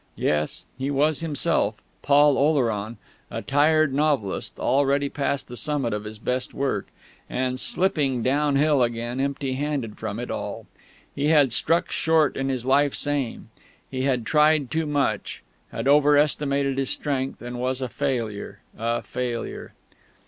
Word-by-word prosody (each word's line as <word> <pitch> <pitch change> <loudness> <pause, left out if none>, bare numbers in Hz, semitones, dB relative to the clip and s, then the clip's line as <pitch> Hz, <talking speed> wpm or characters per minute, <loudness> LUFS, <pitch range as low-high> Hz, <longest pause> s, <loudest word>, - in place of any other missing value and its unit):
Yes, 75 0 -1
he 135 +1 -1
was 145 +2 +2
himself, 155 -5 0 0.2
Paul 145 0 +5
Oleron, 115 -7 +1 0.3
a 115 0 -5
tired 150 +3 +3
novelist, 140 -9 0
already 140 +1 +2
past 140 -1 -2
the 125 - -8
summit 135 -4 -1
of 105 0 -4
his 105 0 -7
best 125 +3 -3
work, 135 -8 -1 0.4
and 130 0 -1
slipping 150 - +1
downhill 145 +1 +2
again 120 +1 -1
empty 140 -1 -1
handed 135 -5 -3
from 110 -2 -4
it 120 - -5
all. - - -5 0.5
He 140 - -2
had 145 -6 +4
struck 165 +7 +1
short 160 -2 +2
in 135 0 -2
his 130 -2 -2
life's 140 +2 +3
aim. 145 -5 -3 0.4
He 130 -1 -3
had 130 -4 0
tried 150 -2 +3
too 160 -1 -1
much, 145 -2 -1 0.3
had - - -3
over 145 +1 +5
estimated 140 -2 +1
his 135 - -1
strength, 135 -2 -2
and 120 +1 -6
was 130 +1 -1
a 130 - -2
failure, 115 -4 -3
a 115 +2 -2
failure.... 125 -2 -5
135 Hz, 150 wpm, -24 LUFS, 125-145 Hz, 0.5 s, Paul